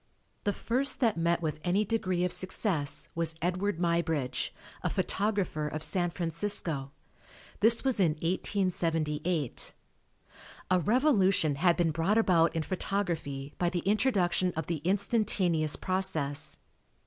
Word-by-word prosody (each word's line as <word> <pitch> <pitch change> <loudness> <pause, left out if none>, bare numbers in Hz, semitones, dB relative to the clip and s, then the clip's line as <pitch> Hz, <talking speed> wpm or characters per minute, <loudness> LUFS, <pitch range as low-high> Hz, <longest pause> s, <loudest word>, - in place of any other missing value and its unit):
The 205 - +2
first 260 +6 0
that 230 -4 +3
met 170 +1 0
with 155 -1 -2
any 195 +4 +1
degree 185 -5 -1
of 180 - -1
success 185 -6 +1
was 165 -1 -1
Edward 180 +3 -1
Muybridge, 165 -6 0 0.3
a - - -1
photographer 195 -7 -1
of 155 +1 -3
San 175 0 +1
Francisco. 165 -4 -1 0.7
This 230 +2 +5
was 265 -5 +1
in 170 -5 +3
1878. 165 - -1 1.0
A 185 - +4
revolution 195 - +3
had 170 +4 +2
been 170 -2 +2
brought 165 +7 +1
about 175 -7 +3
in 160 - 0
photography 165 -7 -3
by 175 - +2
the 175 -1 -3
introduction 195 -4 +2
of 160 -1 -3
the 170 0 -2
instantaneous 185 -3 0
process. 155 -6 -1
175 Hz, 125 wpm, -29 LUFS, 160-200 Hz, 1.0 s, This